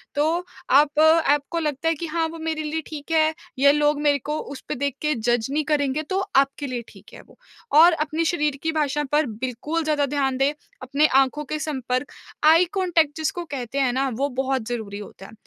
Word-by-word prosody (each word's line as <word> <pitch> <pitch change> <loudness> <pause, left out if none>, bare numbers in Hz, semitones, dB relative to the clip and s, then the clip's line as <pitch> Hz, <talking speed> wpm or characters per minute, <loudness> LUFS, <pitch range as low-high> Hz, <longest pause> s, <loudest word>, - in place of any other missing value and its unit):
तो 320 +5 +1 0.2
आप 290 +2 +4
आपको 315 0 +3
लगता 300 -1 -2
है 330 - +1
कि, 335 - -5
"हाँ, 325 0 -1
वो 330 +1 -8
मेरे 320 -1 -3
लिए 310 +1 -3
ठीक 300 0 -8
है 315 -1 +3 0.3
या 280 +1 +6
लोग 295 0 +2
मेरे 290 -1 +2
को 300 - 0
उसपे 280 +2 -7
देख 280 0 -2
के 300 0 +1
जज 240 0 0
नहीं 305 +2 0
करेंगे।" 290 -1 0
तो 380 - 0 0.2
आपके 275 +1 +2
लिए 250 -2 -4
ठीक - - -17
है - - -11
वो - - -21 0.4
और 340 +2 +8
अपने 310 +1 -1
शरीर 300 -4 0
की 320 - 0
भाषा 295 -2 0
पर 300 +1 +3 0.2
बिल्कुल 290 +7 -2
ज़्यादा 300 -2 +1
ध्यान 270 -2 -1
दें। 275 +2 +2 0.3
अपने 275 +4 +1 0.2
आँखों 270 +3 -1
के 305 +3 -4
संपर्क, 260 -3 -3 0.3
आई 325 +3 +6
कॉन्टैक्ट 340 -6 +1
जिसको 320 +2 -2
कहते 275 -3 -4
हैं 265 -3 +2
ना, 270 +2 0
वो 265 +4 -2
बहुत 265 +1 -1
ज़रूरी 220 -4 -4
होता 195 -2 -11
है। - - -12
295 Hz, 205 wpm, -23 LUFS, 270-315 Hz, 0.4 s, और